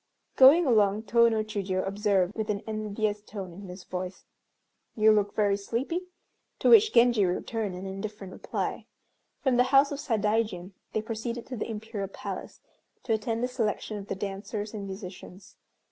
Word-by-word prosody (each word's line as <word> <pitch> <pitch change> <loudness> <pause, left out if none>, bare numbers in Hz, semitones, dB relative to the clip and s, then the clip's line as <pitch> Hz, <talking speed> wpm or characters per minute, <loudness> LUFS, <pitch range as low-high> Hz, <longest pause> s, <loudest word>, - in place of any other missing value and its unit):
Going 290 +6 +8
along 215 -4 +3
Tô 235 +2 +4
no 220 -1 0
Chiûjiô 195 -3 -2
observed 200 -2 +1
with 220 -1 -4
an 205 -1 -1
envious 215 -1 -2
tone 195 -4 -8
in 195 +3 -10
his 180 +1 -9
voice, 185 0 -6 0.7
"You 220 0 +5
look 205 -1 +1
very 205 -2 +3
sleepy;" 260 - -3 0.5
to - - +2
which 440 -2 +8
Genji 235 -3 +5
returned 195 +2 -2
an 185 +2 -7
indifferent 195 0 -6
reply. - - -4 0.6
From 260 -4 +3
the 250 - +5
house 275 +2 +5
of 285 - -4
Sadaijin 210 -6 0 0.2
they 215 - -1
proceeded 230 +1 -4
to 260 - -6
the 225 - -4
Imperial 215 -2 -4
Palace - - -7 0.4
to 230 - 0
attend 225 +2 -1
the - - +2
selection 225 -4 -2
of 200 -1 -8
the - - -3
dancers 205 +2 -5
and 200 -2 -5
musicians. 190 0 -9
215 Hz, 165 wpm, -28 LUFS, 195-230 Hz, 0.7 s, Going